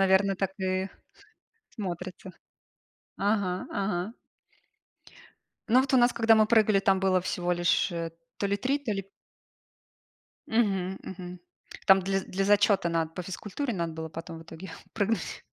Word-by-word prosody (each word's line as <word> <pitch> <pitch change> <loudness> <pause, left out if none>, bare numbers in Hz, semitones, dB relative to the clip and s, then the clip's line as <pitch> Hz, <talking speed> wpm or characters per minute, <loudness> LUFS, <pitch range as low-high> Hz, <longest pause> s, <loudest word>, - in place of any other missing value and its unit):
,наверно, 195 0 +4
так 195 -1 -1
и 185 0 0 0.8
смотрится. 185 -2 -6 0.9
Ага, 200 -3 0
ага. 195 +3 -2 1.5
Ну 250 +3 +6
вот 270 0 -1
у - - +7
нас, 240 0 +5
когда 225 -1 +5
мы 215 -1 +5
прыгали, 215 -3 +4
там 195 -1 +3
было 185 -1 +3
всего 175 0 -2
лишь, 175 +2 +2
э, 165 -1 -3 0.3
то 200 - -1
ли 200 +1 +1
3, 270 +6 0
то 245 -7 -3
ли 195 -1 -2 1.5
Мгм, 195 -5 +1
мгм. 180 -1 -7 0.6
Там 195 0 +7
для 195 +1 0
для 195 +1 -2
зачёта 205 -3 +4
надо, 165 -1 0
по 180 - -5
физкультуре 210 +8 -4
надо 170 -4 -2
было 160 0 -5
потом 165 +1 -8
в 165 - -10
итоге 165 +2 -10 0.2
прыгнуть. 220 +1 -1
195 Hz, 145 wpm, -28 LUFS, 180-210 Hz, 1.5 s, у